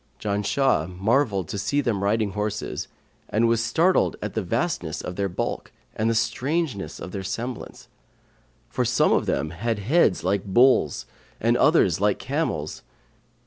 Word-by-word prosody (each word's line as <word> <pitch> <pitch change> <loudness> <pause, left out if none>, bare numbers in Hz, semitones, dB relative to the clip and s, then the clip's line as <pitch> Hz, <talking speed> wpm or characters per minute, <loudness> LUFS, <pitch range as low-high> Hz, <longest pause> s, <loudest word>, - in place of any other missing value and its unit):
Janshah 105 - +1
marvelled 105 - +1
to 100 - -3
see 105 +9 0
them 115 -8 0
riding 105 0 +1
horses, 105 +1 -3 0.4
and 115 +2 +2
was 115 0 +2
startled 165 +11 +2
at 105 -1 -5
the 110 - -1
vastness 105 - -2
of 90 - -6
their 100 0 -1
bulk 90 - -4 0.2
and 110 +1 0
the 115 - +1
strangeness 125 - -1
of 90 - -7
their 100 - -4
semblance; 115 +6 -6 0.8
for - - -1
some - - +2
of - - +1
them 80 - -1
had 110 +6 -2
heads 110 - +2
like 95 +2 0
bulls 105 - +3 0.3
and - - +2
others 90 +1 +3
like 105 -1 +2
camels. 130 - -3
105 Hz, 150 wpm, -24 LUFS, 95-125 Hz, 0.8 s, bulls